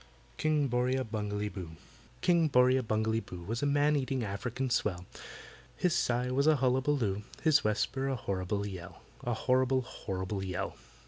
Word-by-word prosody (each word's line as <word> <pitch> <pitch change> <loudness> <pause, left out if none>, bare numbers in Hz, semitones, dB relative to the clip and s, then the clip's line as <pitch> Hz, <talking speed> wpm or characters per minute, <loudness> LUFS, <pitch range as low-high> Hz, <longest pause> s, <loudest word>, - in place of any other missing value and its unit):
KING 155 -2 +2
BORRIA 125 +1 +1
BUNGALEE 105 -2 -3
BOO 90 -4 -7 0.5
KING 170 -2 +4
BORRIA 130 -1 +4
BUNGALEE 110 -1 0
BOO 90 -5 -9
Was 115 +6 -3
a 145 - +2
man 145 +1 +3
eating 130 -2 -1
African 120 +5 -3
swell; 90 -5 0 0.7
His 175 -2 +2
sigh 125 +1 +1
was 140 +3 +2
a 155 - +6
hullaballoo, 130 -5 +1 0.2
His 155 -1 +5
whisper 110 +5 0
a 135 - 0
horrible 100 -2 -2
yell— 95 -4 -8 0.2
A 120 -1 -1
horrible, 130 +2 +2
horrible 95 -3 -4
yell! 95 -2 -3
125 Hz, 150 wpm, -31 LUFS, 105-135 Hz, 0.7 s, a